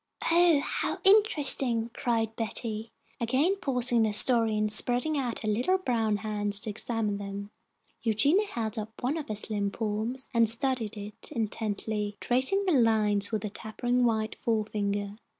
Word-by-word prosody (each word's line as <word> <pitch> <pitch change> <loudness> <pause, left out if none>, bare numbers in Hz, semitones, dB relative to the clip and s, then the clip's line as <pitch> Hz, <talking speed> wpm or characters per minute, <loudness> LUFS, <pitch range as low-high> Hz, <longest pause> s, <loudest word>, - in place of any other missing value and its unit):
"Oh, 335 -3 +4
how - - -3
interesting!" 280 - +5
cried 225 -2 -2
Betty, 225 -1 -3 0.3
again 265 - +1
pausing 250 -7 +2
in 225 - +3
her 215 - -2
story, 225 -1 +5
and 215 0 0
spreading 250 +8 +3
out 255 -5 -3
her - - -4
little 245 - +1
brown 225 - -1
hands, 205 -1 -1
to 215 - -4
examine 215 -1 -2
them, 200 0 -7 0.5
Eugenia 280 - +2
held 225 - -4
up 220 +2 -9
one 265 +5 -1
of 315 -3 -6
her 215 - -4
slim 205 -1 -1
palms, 220 +5 -4
and 230 -2 +3
studied 230 -3 0
it 205 0 -9
intently, 210 -1 -3
tracing 265 +12 +1
the 370 - +1
lines 215 -5 +2
with 215 -2 -3
a 210 - -5
tapering 245 +4 -2
white 220 -2 0
forefinger. 205 -2 -3
225 Hz, 155 wpm, -27 LUFS, 210-250 Hz, 0.5 s, interesting